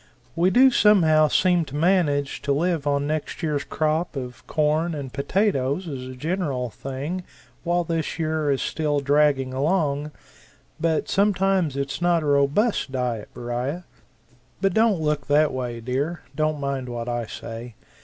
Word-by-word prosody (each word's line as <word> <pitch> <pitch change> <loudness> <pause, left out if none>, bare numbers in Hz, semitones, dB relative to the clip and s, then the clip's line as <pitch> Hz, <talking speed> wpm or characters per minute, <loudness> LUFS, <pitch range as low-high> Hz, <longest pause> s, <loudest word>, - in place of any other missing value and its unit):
We 170 +2 +3
do 260 +6 +6
somehow 165 -9 +5
seem 175 +2 +3
to 140 - -9
manage 150 -4 +1
to 140 - -1
live 160 0 0
on 140 0 +1
next 155 +3 -3
year's 150 -3 0
crop 155 +3 -1
of 125 -2 -7
corn 155 +2 +1
and 135 -4 -6
potatoes 145 0 0
as 135 -5 -5
a 130 - -8
general 140 -5 -2
thing 140 +10 -5 0.4
while 175 0 +1
this 165 -2 -2
year 155 -2 -1
is 135 -2 +1
still 150 -2 0
dragging 140 -2 +2
along, 145 0 0 0.7
but 165 -2 0
sometimes 195 -6 +1
it's 140 +3 -3
not 175 -2 +2
a - - -3
robust 145 - +2
diet, 125 -5 -2
Beriah. 125 +8 -3 0.8
But 195 0 +1
don't 220 -4 +3
look 150 -2 -1
that 150 +1 +3
way, 125 -2 -4
dear 135 +8 -2
don't 155 0 0
mind 135 -2 -3
what 120 -1 -5
I 120 -2 -2
say. 115 +1 -8
150 Hz, 155 wpm, -24 LUFS, 135-170 Hz, 0.8 s, do